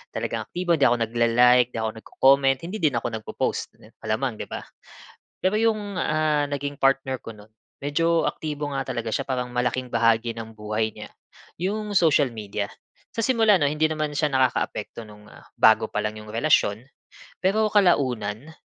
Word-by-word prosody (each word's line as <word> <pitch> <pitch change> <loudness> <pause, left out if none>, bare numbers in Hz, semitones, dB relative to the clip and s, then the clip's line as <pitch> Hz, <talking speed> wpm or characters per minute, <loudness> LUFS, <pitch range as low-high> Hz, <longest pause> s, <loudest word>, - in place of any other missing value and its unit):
talagang - - -3
aktibo. 175 -2 0
Hindi 140 - +5
ako 120 - +3
nagla-like, 120 +2 +3
hindi - - -2
ako 110 - -1
nagco-comment, 135 +3 +3
hindi 185 +6 -5
din 150 -7 +1
ako 120 - -1
nagpo-post, 110 - -3
ganun. - - -19
Malamang, 110 +1 -2
'di - - -5
ba? - - -6 0.8
Pero 190 +3 +2
'yong 215 -3 0
ah, 155 -2 +1
naging 145 0 -4
partner 135 -1 +1
ko 115 - -10
no'n, 105 0 -16 0.3
medyo 165 +4 +1
aktibo 150 -2 -5
nga 135 -1 -3
talaga 115 -1 -3
siya, - - -2
parang 125 -2 -2
malaking 125 +1 -1
bahagi 115 0 +2
ng 110 -1 -8
buhay 110 0 -2
niya, - - -10 0.5
'yong 210 +4 -2
social 150 -5 +3
media. 105 -2 -5 0.4
Sa - - -19
simula 225 -6 +4
'no, 145 - +2
hindi 155 +2 +1
naman 155 -1 -2
siya 150 0 +1
nakakaapekto 130 -2 -1
no'ng 105 -1 -14
ah, - - -15 0.2
bago - - +5
pa - - -3
lang 105 0 -3
'yong 105 - -11
relasyon, 115 -2 +1 0.5
pero 215 +3 +1
kalaunan, 135 - +1
135 Hz, 170 wpm, -24 LUFS, 115-155 Hz, 0.8 s, Hindi